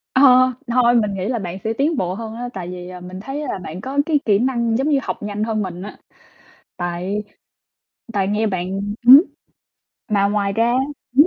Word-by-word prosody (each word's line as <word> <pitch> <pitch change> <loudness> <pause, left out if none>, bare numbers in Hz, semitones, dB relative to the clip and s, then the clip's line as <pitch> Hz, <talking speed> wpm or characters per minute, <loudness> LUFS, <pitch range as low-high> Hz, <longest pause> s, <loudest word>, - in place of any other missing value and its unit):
Ờ, 260 - +5 0.5
thôi 240 0 +3
mình 210 -2 -2
nghĩ 190 0 -3
là 240 -1 -1
bạn 180 -1 -5
sẽ 220 - -1
tiến 290 +6 0
bộ 180 -4 -1
hơn 220 +2 -6
á, 245 +1 -5
tại 180 -2 -6
vì, 180 0 -7
ờ, 180 - -9
mình 180 +1 -8
thấy 270 +8 -5
là 200 - -3
bạn 170 +4 -7
có 270 +5 -3
cái 305 -2 +2
kỹ 205 -2 +3
năng 235 -3 +1
giống 275 +4 0
như 280 - +3
học - - -5
nhanh 210 0 -3
hơn 220 -1 -1
mình 180 -2 -5
á. 205 +2 -8 0.8
Tại 180 +4 -3 0.9
tại 195 -2 0
nghe 210 +2 0
bạn 185 -3 -2
ừm 195 +1 -3 0.2
hứm, 270 +7 +10 0.8
mà 205 -2 +2
ngoài 200 -1 0
ra 230 +3 +2 0.4
hửm? 295 +4 +8
210 Hz, 210 wpm, -20 LUFS, 190-240 Hz, 0.9 s, hứm